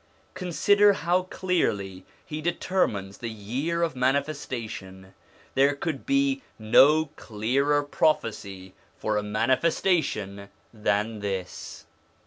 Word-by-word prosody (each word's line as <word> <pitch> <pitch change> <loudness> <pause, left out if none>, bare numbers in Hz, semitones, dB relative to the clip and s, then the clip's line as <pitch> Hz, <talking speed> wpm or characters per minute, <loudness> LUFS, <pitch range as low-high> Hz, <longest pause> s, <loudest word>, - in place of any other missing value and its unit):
Consider 200 +3 +3
how 175 +1 +1
clearly 100 - -1 0.2
he 155 -1 -5
determines 155 - -1
the 115 - -4
year 130 +11 -2
of 160 -5 -1
manifestation; 125 -8 -3 0.4
there 140 +1 +3
could 150 -1 -4
be 275 0 +2 0.2
no 145 +8 +5
clearer 135 +7 0
prophecy 100 -10 -1 0.2
for 110 - -1
a - - +1
manifestation 110 - 0 0.2
than 105 0 -1
this. 95 -3 -5
130 Hz, 100 wpm, -26 LUFS, 105-165 Hz, 0.4 s, no